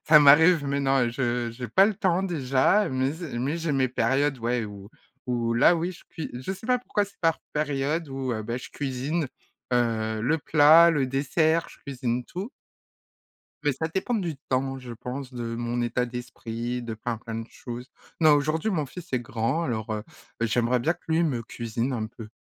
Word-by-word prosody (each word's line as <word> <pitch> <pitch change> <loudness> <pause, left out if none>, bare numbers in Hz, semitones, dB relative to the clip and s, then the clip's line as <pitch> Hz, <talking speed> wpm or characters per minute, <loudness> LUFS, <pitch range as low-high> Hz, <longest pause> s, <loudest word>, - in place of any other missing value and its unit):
ça 150 -1 +9
m'arrive 155 +3 +7
mais 140 0 0
non, 135 -3 +2
je 120 -1 -1
j'ai 125 +2 -6
pas 195 - +5
le 215 - 0
temps 185 -3 +1
déjà, 160 +3 +2
mais 130 +1 0
zé 160 -6 -6
mais 140 +6 -1
j'ai 165 -2 -1
mes 130 -2 +2
périodes, 135 +3 +1
ouais, 120 0 0
où 100 -1 -9 0.4
où 120 -2 0
là, 120 +9 +6
oui, 170 +2 -1
je - - -15
cui 160 - -6
je 130 +9 -4
sais 195 +3 -9
pas 250 - +4
pourquoi 210 -4 0
c'est 200 - -17
par 165 -1 +2
période 150 +2 -1
où, 135 -1 -3
heu, 110 -1 -3
beh, 120 +3 -3
je - - -10
cuisine, 140 +4 -2 0.5
heu, 110 -2 +1
le 150 +8 +2
plat, 160 +3 +7
le 145 -5 +1
dessert, 155 +5 +1
je - - -16
cuisine 125 -3 -3
tout 190 - -6 1.1
mais 145 - +3
ça 150 +5 -2
dépend 190 +8 -2
du 175 -7 -2
temps, 135 +1 0
je 125 -2 -8
pense, 125 +3 -6
de 115 -1 -4
mon 120 +1 -2
état 120 +1 0
d'esprit, 120 0 -5
de 115 -2 -5
plein, 115 +1 -4
plein 115 0 -7
de 115 0 -5
choses. 125 +1 -8 0.3
Non, 155 -2 +6
aujourd'hui, 155 +7 +1
mon 160 -8 0
fils 175 +5 -10
est 125 - +3
grand 120 +7 -1
alors, 110 -6 -3
heu, 105 -1 -4 0.4
j'aimerais 120 +2 +2
bien 155 +8 +1
que - - -22
lui 165 +1 +2
me 135 -8 0
cuisine 115 +3 -3
un 110 -3 -2
peu. 110 0 -10
135 Hz, 200 wpm, -26 LUFS, 120-160 Hz, 1.1 s, ça